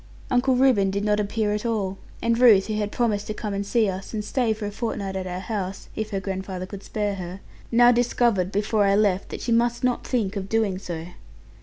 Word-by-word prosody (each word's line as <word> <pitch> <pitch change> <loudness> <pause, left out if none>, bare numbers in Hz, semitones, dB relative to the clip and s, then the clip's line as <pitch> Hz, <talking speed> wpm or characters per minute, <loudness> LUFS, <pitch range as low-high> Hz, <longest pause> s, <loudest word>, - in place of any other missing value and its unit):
Uncle 250 +1 +3
Reuben 250 -7 +4
did 200 +2 -2
not 210 0 +2
appear 210 0 0
at 210 - -2
all; 205 -5 -1 0.2
and 230 0 +2
Ruth, 220 -6 +7
who 215 - -3
had 210 -1 -1
promised 215 -4 0
to 215 - -4
come 210 -2 -4
and 200 0 -1
see 220 +1 +2
us, 190 +3 -5
and 210 -1 -3
stay 245 -2 +1
for 215 -1 -3
a 205 - -3
fortnight 205 -3 -3
at 190 -1 -3
our 180 0 -4
house 195 -2 -4
(if 220 0 -3
her 195 -3 -2
grandfather 190 -1 -4
could 195 +1 -9
spare 205 0 -2
her), 185 -1 -6 0.3
now 240 +1 +6
discovered, 235 -6 +2
before 210 +1 +1
I 195 0 +4
left, 200 -3 +1
that - - -6
she 235 - -2
must 240 +1 +2
not 250 -1 +1
think 220 -6 -1
of 195 -1 -4
doing 215 -4 +1
so. 170 -4 -5
210 Hz, 225 wpm, -24 LUFS, 195-230 Hz, 0.3 s, Ruth